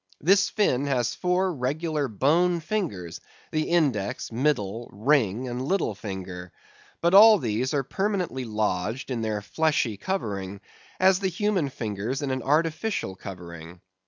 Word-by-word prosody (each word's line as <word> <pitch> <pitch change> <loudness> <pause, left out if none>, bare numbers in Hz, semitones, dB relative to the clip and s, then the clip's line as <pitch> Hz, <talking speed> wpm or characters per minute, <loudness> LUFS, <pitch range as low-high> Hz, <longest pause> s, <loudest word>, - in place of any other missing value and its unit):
This 195 +5 +4
fin 145 - +1
has 125 -4 0
four 180 +1 0
regular 150 +2 -1
bone 165 - +2
fingers, 150 - -4 0.3
the 155 0 -1
index, 135 - 0
middle, 115 -4 -1
ring, 120 0 +1
and 125 0 -4
little 155 - 0
finger. 95 -3 -7 0.5
But 170 +2 +2
all 215 +2 +9
these 120 - -1
are 140 - +1
permanently 185 - -2
lodged 110 +3 -2
in 120 -3 -2
their 105 -2 -2
fleshy 145 -5 0
covering, 100 - -3 0.4
as 185 0 +5
the 195 - 0
human 185 -4 0
fingers 115 +3 -4
in 135 - -1
an 130 0 -2
artificial 160 - 0
covering. 85 -3 -9
130 Hz, 135 wpm, -26 LUFS, 105-170 Hz, 0.5 s, all